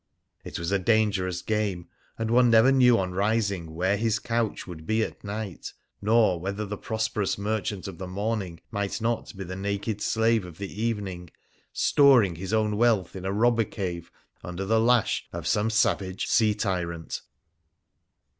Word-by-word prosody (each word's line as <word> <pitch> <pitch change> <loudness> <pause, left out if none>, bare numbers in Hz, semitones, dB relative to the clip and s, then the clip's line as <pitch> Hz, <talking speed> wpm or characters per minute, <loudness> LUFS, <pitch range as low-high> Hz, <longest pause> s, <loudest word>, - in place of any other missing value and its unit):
It - - -6
was 85 +2 -3
a 100 - +2
dangerous 95 -4 +1
game, 105 -5 -1 0.3
and 115 0 -2
one 125 0 +5
never 115 +3 +6
knew 125 -3 +5
on 95 -1 -1
rising 100 -4 -1
where 95 +4 +1
his 110 0 +1
couch 115 0 -2
would 80 -3 -10
be 110 +1 +2
at - - -7
night, 100 -3 -6 0.3
nor 105 -4 +3
whether 100 +4 -3
the 105 +1 -4
prosperous 110 -1 -2
merchant 105 -1 -2
of 95 -4 -8
the 95 - -5
morning 100 -2 -3
might 100 -1 -2
not 115 +1 -1
be 95 - -4
the 95 +1 -6
naked 100 +2 -3
slave 115 -1 +2
of 85 -3 -10
the 100 +1 -6
evening, 95 -6 -3 0.4
storing 125 - +4
his 95 +3 -5
own 110 -1 +1
wealth 110 -7 +2
in 95 -1 -6
a 95 - -1
robber 115 +3 +3
cave 90 -5 -5 0.3
under 90 +2 -5
the 110 +3 +3
lash 120 -1 +2
of - - -6
some 105 +2 +1
savage 95 -4 +1
sea 110 -2 +3
tyrant. 90 -5 -3
100 Hz, 165 wpm, -26 LUFS, 95-110 Hz, 0.4 s, never